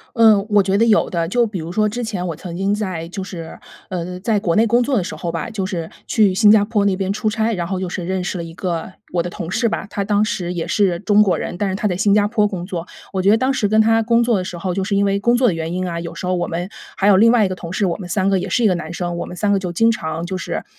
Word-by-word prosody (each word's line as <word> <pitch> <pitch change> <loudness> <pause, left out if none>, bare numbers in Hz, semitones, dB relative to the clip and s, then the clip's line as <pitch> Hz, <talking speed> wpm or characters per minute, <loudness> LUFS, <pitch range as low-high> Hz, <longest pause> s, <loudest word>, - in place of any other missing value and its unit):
嗯， 220 -3 +5
我 205 -1 +5
觉 190 +1 +1
得 225 - +4
有 220 -2 +3
的。 170 -2 -2
就 240 +4 +2
比 210 -3 -5
如 160 +1 -6
说 215 +4 +1
之 240 +4 -4
前 200 -5 -3
我 170 - -3
曾 170 +2 -8
经 195 +2 0
在 185 -6 -3
就 190 +2 -6
是， 170 -4 -8 0.3
呃， 180 0 -4
在 210 0 +1
国 170 -1 0
内 225 - +4
工 240 +2 +3
作 260 +1 0
的 190 - +1
时 185 - -5
候 170 - -4
吧， 165 +6 -4
就 210 -4 -3
是 175 -4 -4 0.2
去 205 -4 +3
新 210 +1 +5
加 210 -1 +6
坡 210 -1 0
那 195 -2 +2
边 195 0 -1
出 215 +1 -1
差， 225 +1 0
然 175 -3 -3
后 190 +1 -2
就 185 - -3
是 175 0 -4
认 185 +1 -2
识 190 - -3
了 170 - -3
一 165 - -9
个 175 0 -3 0.2
我 175 - +1
的 175 - -5
同 175 -3 -6
事 230 +4 +1
吧， 195 - -3
他 200 - -3
当 205 +1 +2
时 180 -4 -3
也 170 -2 -3
是 190 -5 +1
中 210 0 +4
国 195 -4 +2
人， 175 - -4
但 200 +1 -1
是 190 - -2
他 210 - -2
在 180 -3 0
新 205 +1 +2
加 205 -1 +4
坡 210 -1 +2
工 185 -4 -4
作。 175 -3 -5 0.3
我 190 - -1
觉 195 - +4
得 220 - +6
当 260 +4 +1
时 210 -6 0
跟 215 +1 +3
他 225 +1 +4
工 235 +1 +3
作 235 -2 +2
的 185 - -2
时 175 -1 -6
候， 180 0 -2
就 195 - -1
是 200 +1 -1
因 200 - +3
为 200 0 +1
工 240 +4 +3
作 250 0 +3
的 190 - +2
原 165 0 -4
因 185 +1 -2
啊， 170 -1 -3
有 170 0 -7
时 180 - -6
候 185 - +1
我 175 - -1
们 175 +2 -3 0.3
还 195 - 0
有 205 - +6
另 225 +4 +6
外 235 -3 +4
一 - - +1
个 185 - -3
同 170 -2 -8
事， 200 +1 0
我 170 - -1
们 185 -3 -8
3 190 +1 0
个 195 -1 +2
也 - - -4
是 240 - +1
一 - - +6
个 185 - +3
男 170 -1 -5
生， 175 -1 -3
我 170 - -4
们 180 - -9
3 205 +2 +1
个 200 - +3
就 180 -2 -4
经 225 +6 +3
常 165 -4 -4
就 185 +1 -4
是， 185 - -4
195 Hz, 350 characters per minute, -19 LUFS, 175-215 Hz, 0.3 s, 加